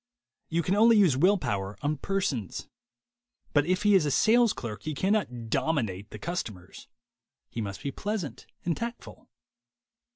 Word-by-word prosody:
You 170 +1 0
can 185 - +1
only 225 +2 +6
use 185 -10 +5
will 185 +9 +4
power 100 - -3
on 150 +1 0
persons. 140 - -2 0.9
But 145 0 +3
if 185 +2 +1
he 210 -1 +5
is 190 -4 +6
a 150 - 0
sales 230 - +4
clerk 110 -3 -6
he 155 -1 -4
cannot 130 - -1
"dominate" 110 - -1
the - - -8
customers: 105 - -6 0.6
he 115 - -3
must 100 -3 -5
be 140 - -2
pleasant 200 - -4 0.2
and 170 -2 +1
tactful. 235 +1 -7
155 Hz, 155 wpm, -28 LUFS, -, 0.9 s, only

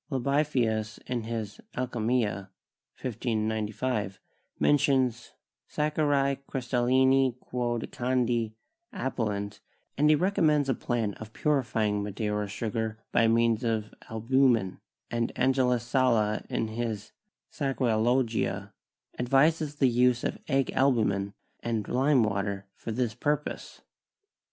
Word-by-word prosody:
Libavius 130 -6 0
in 120 -3 -3
his 110 -3 -5 0.2
'Alchymia' 115 -5 -1 0.5
(1595) 110 -2 -2 0.4
mentions 130 -5 +2 0.4
"Sacchari 145 -2 +1
crystallini 130 0 +2
quod 120 -2 -2
candi 120 -3 0 0.4
appellant," 105 - -3 0.4
and 150 +1 +3
he 155 - +7
recommends 155 -4 +2
a 135 - +2
plan 115 -4 -1
of 110 0 -9
purifying 115 -8 +1
Madeira 105 0 -2
sugar 110 +1 -3
by 115 - +4
means 115 0 +3
of 110 -2 -1 0.2
albumen, 115 -3 +2 0.3
and 115 0 0
Angelus 125 -2 +2
Sala 120 -4 +2
in 110 - -1
his 110 -2 -4 0.4
'Saccharalogia' 115 - 0 0.5
advises 150 +4 +2
the 140 -2 +3
use 125 0 +3
of - - -2
egg 135 0 +1
albumen 105 -7 +1 0.2
and 115 -3 -2
lime 130 0 +3
water 100 -1 -2
for 115 - -6
this 120 0 -1
purpose. 150 +5 -3
120 Hz, 105 wpm, -28 LUFS, 110-130 Hz, 0.5 s, he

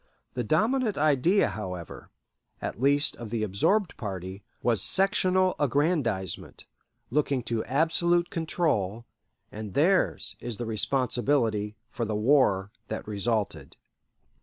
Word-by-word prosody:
The 125 - -2
dominant 220 - +1
idea, 155 - +3
however, 90 -4 -7 0.5
at 110 - -5
least 145 +2 +3
of 115 -2 -7
the 110 -1 -2
absorbed 160 - +1
party, 95 -2 -6 0.2
was 115 -3 +2
sectional 185 -1 +2
aggrandizement, 140 - -1 0.5
looking 140 -2 +1
to 115 -1 -2
absolute 170 +5 +2
control, 120 - -1 0.5
and 105 -2 -7
theirs 150 - +2
is 120 -3 -5
the 120 - -4
responsibility 115 -2 0 0.2
for 120 - -3
the 105 -1 -2
war 105 -4 +3 0.2
that - - -5
resulted. 105 0 -2
120 Hz, 110 wpm, -27 LUFS, 105-160 Hz, 0.5 s, idea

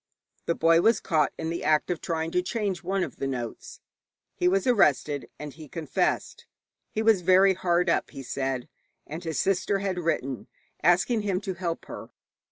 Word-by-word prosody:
The 170 - +1
boy 165 +1 +4
was 225 +5 +4
caught 160 -4 +1
in 160 0 -3
the 170 - -4
act 155 +2 +2
of 175 - -3
trying 165 -1 -2
to 180 - +2
change 195 -1 -2
one 190 +1 -1
of - - -6
the 135 - -2
notes. 120 -4 -6 0.5
He 180 - 0
was 190 +1 +2
arrested, 150 - +2
and 150 -2 -7
he 155 -1 -11
confessed. 155 -3 -2 0.4
He 220 - -2
was 220 -4 +4
very 190 +2 +5
hard 180 -1 +1
up, - - +1
he 135 -2 -9
said, 130 0 -3 0.4
and 160 +4 -7
his 160 -3 -3
sister 195 +1 +1
had 190 -2 -2
written 135 -6 -2 0.3
asking 185 +7 +3
him 195 -3 -1
to 190 -1 -3
help 170 -2 -4
her. - - -9
175 Hz, 180 wpm, -27 LUFS, 155-190 Hz, 0.5 s, very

